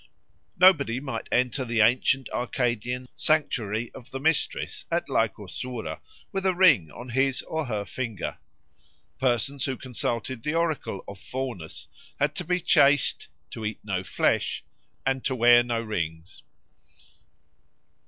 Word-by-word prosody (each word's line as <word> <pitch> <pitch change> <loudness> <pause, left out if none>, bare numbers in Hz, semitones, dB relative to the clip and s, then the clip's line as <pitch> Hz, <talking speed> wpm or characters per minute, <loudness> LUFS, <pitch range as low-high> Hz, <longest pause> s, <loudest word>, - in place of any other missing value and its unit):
Nobody 155 -10 +5
might 135 0 -5
enter 125 +2 +1
the 115 -2 +1
ancient 125 +4 +3
Arcadian 125 0 -1
sanctuary 120 -8 0
of 125 -1 -11
the 135 - -5
Mistress 160 +2 0
at - - 0
Lycosura 125 -3 -2 0.3
with 195 -1 -2
a 190 -1 +2
ring 165 - +5
on 120 +9 -10
his 135 +2 +1
or 160 -3 -3
her 105 -3 -2
finger. 115 -3 -4 0.8
Persons 130 +1 +1
who 130 -2 -2
consulted 120 -1 -3
the 150 +6 -2
oracle 160 - -1
of 100 -1 -9
Faunus 90 - -5 0.3
had 145 +1 +2
to 180 - -4
be 180 +2 0
chaste, 145 -5 +3 0.2
to 115 - -7
eat 105 -1 -2
no 95 -3 -2
flesh, - - 0 0.4
and 135 -1 0
to 130 - 0
wear 120 0 +7
no 120 -1 -1
rings. 85 -6 -4
125 Hz, 135 wpm, -26 LUFS, 115-140 Hz, 0.8 s, wear